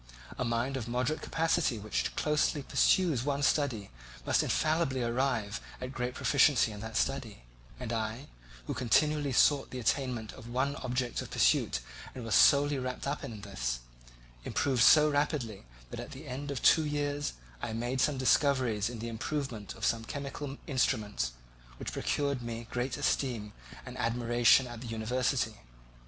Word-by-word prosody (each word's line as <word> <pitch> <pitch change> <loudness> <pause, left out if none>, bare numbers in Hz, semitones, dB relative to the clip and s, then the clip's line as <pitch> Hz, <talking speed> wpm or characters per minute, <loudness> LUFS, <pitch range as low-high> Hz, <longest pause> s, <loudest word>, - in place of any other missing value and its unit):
A - - +1
mind 120 +3 -1
of 120 -3 -5
moderate 125 +6 -1
capacity 160 -6 +1
which 105 0 -2
closely 150 -1 +1
pursues 160 -4 +3
one 140 0 -1
study 130 - +1 0.3
must - - +3
infallibly 155 -5 +1
arrive 115 -4 -1 0.2
at 125 0 -5
great 125 -1 -3
proficiency 135 -4 +4
in 105 - -8
that 110 +1 -4
study; 115 - -2 0.4
and 120 -2 -4
I, 110 +4 -3 0.4
who - - -3
continually 145 +4 +2
sought 135 +3 +4
the 130 - -6
attainment 125 -3 -1
of 120 -2 -11
one 130 +4 0
object 125 -1 -2
of - - -8
pursuit - - +2 0.3
and 125 - -6
was 115 - -2
solely 145 0 +5
wrapped 125 0 -4
up 140 +2 -2
in 115 -7 -7
this, - - -3 0.6
improved 130 -4 0
so 150 +5 +8
rapidly 145 - -1 0.3
that - - -6
at - - -7
the 145 +3 -10
end 140 +2 -5
of 140 -4 -4
two 160 - +6
years 145 -1 -2 0.3
I - - -3
made 120 +3 -1
some 150 -2 +2
discoveries 130 -5 +2
in 120 - -6
the 115 +2 -5
improvement 115 -2 -4
of - - -3
some 115 -1 +1
chemical 140 +2 -5
instruments, 105 - 0 0.4
which - - -5
procured 140 -3 -1
me 115 0 -5
great 125 +2 -2
esteem 120 -7 -1 0.3
and 130 -1 -8
admiration 120 +1 +4
at 120 -2 -8
the 125 - -7
university. 115 0 -1
125 Hz, 160 wpm, -31 LUFS, 115-140 Hz, 0.6 s, so